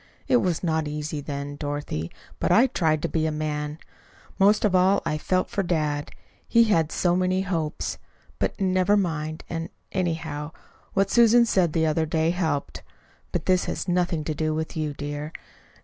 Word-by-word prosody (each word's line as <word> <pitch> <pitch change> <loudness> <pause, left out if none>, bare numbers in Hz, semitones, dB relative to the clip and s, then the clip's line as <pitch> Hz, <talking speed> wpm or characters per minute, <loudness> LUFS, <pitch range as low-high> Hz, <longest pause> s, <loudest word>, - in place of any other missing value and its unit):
It 250 - +5
was 180 -7 0
not 160 -3 0
easy 150 0 -4
then, 145 0 -5
Dorothy, 145 - -3 0.3
but - - +1
I 235 - +6
tried 160 - +1
to - - +1
be 160 -1 0
a - - 0
man. 150 0 -3 0.6
Most 205 +3 +5
of 205 - +2
all 185 +2 +4
I 155 -2 -1
felt 185 +3 0
for 200 - 0
dad. 155 -5 -1 0.4
He'd 230 0 +5
had 165 -8 +2
so 175 -1 +2
many 185 +1 +1
hopes 165 -5 -2 0.4
But, - - -1
never 185 +1 +3
mind; 160 -4 -2
and, 165 -1 -4 0.2
anyhow, 160 -4 -2 0.4
what 195 0 +1
Susan 235 0 +6
said 180 -8 +2
the 160 -1 +2
other 160 0 +1
day 160 +1 +1
helped 160 -5 -2 0.5
But 170 -3 -2
this 185 -1 +3
has - - -3
nothing 175 -3 +1
to 155 - -2
do 155 +1 -1
with 160 0 -3
you, 155 -2 -2
dear. 145 +2 -5
160 Hz, 175 wpm, -25 LUFS, 150-185 Hz, 0.6 s, I